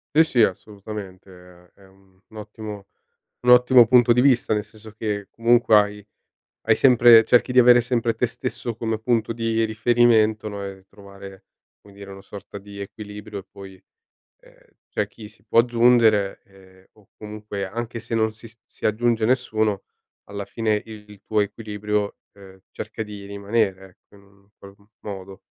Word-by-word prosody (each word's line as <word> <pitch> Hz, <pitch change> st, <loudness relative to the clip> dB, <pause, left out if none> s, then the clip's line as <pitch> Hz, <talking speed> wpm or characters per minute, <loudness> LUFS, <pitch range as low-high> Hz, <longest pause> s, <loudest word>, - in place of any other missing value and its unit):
Sì, 160 Hz, -, +6 dB
sì, 125 Hz, -7 st, +2 dB
assolutamente, 100 Hz, -1 st, -5 dB, 0.4 s
è -, -, -23 dB
è -, -, -18 dB
un 95 Hz, 0 st, -26 dB
un 110 Hz, -, -17 dB
ottimo 105 Hz, -1 st, -9 dB, 0.6 s
un 125 Hz, -, +1 dB
ottimo 125 Hz, -1 st, +6 dB
punto 120 Hz, 0 st, +5 dB
di 125 Hz, -, +2 dB
vista, 125 Hz, -4 st, +2 dB
nel 105 Hz, -1 st, -1 dB
senso 110 Hz, +1 st, -15 dB
che 105 Hz, -2 st, -4 dB
comunque 115 Hz, -1 st, +3 dB
hai 105 Hz, -1 st, +1 dB, 0.6 s
hai 110 Hz, -, +5 dB
sempre 120 Hz, -3 st, +6 dB
cerchi 125 Hz, +1 st, +3 dB
di 125 Hz, -, -2 dB
avere 120 Hz, 0 st, +6 dB
sempre 120 Hz, -1 st, -1 dB
te 125 Hz, -, -1 dB
stesso 120 Hz, -1 st, -6 dB
come 110 Hz, -1 st, -3 dB
punto 115 Hz, 0 st, -1 dB
di 115 Hz, -1 st, -1 dB
riferimento, 110 Hz, -1 st, +2 dB
no, 100 Hz, -1 st, -6 dB
e 95 Hz, -1 st, -9 dB
trovare, 100 Hz, -1 st, -14 dB, 0.4 s
come 100 Hz, -, -18 dB
dire, 100 Hz, 0 st, -11 dB
una 95 Hz, 0 st, -11 dB
sorta 100 Hz, +1 st, -11 dB
di 100 Hz, 0 st, -12 dB
equilibrio 105 Hz, +1 st, -9 dB
e -, -, -12 dB
poi, 95 Hz, -1 st, -13 dB, 0.6 s
ehm, -, -, -22 dB, 0.3 s
c'è -, -, -2 dB
chi 110 Hz, -2 st, -13 dB
si 105 Hz, -1 st, -24 dB
può 115 Hz, +1 st, +4 dB
aggiungere, 115 Hz, -4 st, +3 dB
ehm, 95 Hz, -1 st, -21 dB
o 105 Hz, -3 st, -25 dB
comunque, 105 Hz, -2 st, -7 dB
anche 115 Hz, +3 st, -6 dB
se 115 Hz, +1 st, -6 dB
non 110 Hz, -1 st, +1 dB
si 115 Hz, +1 st, -14 dB
si -, -, -6 dB
aggiunge 115 Hz, +1 st, 0 dB
nessuno, 110 Hz, -5 st, 0 dB, 0.4 s
alla 100 Hz, 0 st, -7 dB
fine 110 Hz, -2 st, -1 dB
il 105 Hz, -2 st, -13 dB
tuo 110 Hz, -1 st, +1 dB
equilibrio, 105 Hz, 0 st, -3 dB, 0.2 s
ehm, 95 Hz, -1 st, -16 dB
cerca 110 Hz, +1 st, -7 dB
di 105 Hz, -2 st, -9 dB
rimanere, 100 Hz, -1 st, -2 dB
ecco, -, -, -23 dB
in 100 Hz, -, -20 dB
un 100 Hz, 0 st, -26 dB
qual 100 Hz, 0 st, -14 dB, 0.3 s
modo. 95 Hz, -2 st, -9 dB
105 Hz, 165 wpm, -22 LUFS, 100-115 Hz, 0.6 s, Sì